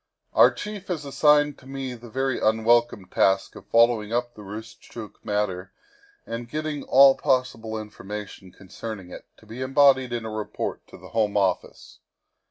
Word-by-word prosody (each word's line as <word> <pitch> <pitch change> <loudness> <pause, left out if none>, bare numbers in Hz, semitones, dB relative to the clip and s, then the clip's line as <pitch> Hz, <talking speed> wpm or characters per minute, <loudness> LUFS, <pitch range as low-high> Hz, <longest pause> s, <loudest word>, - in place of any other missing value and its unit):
Our - - +7
chief 205 -2 -7
has 160 -5 -3
assigned 145 +1 +3
to 130 - -16
me 135 -1 -5
the 120 0 -11
very 135 +2 -1
unwelcome 110 -1 +2
task 95 +1 +1
of - - -12
following 115 -2 +3
up 120 0 -1
the 105 - -12
Roostchook 110 +1 -10
matter 95 -3 -2 0.5
and 115 +1 -6
getting 155 0 -3
all 135 +1 +7
pos 130 -3 +1
sible 110 -1 -6
information 105 -2 -8
concerning 95 0 -9
it, - - -10
to - - -20
be 115 +4 -8
embodied 130 -1 +4
in 120 -1 -3
a 110 - -5
report 110 -1 -5
to - - -13
the - - -13
Home 105 -2 0
Office. 95 -3 -2
115 Hz, 165 wpm, -25 LUFS, 105-135 Hz, 0.5 s, Our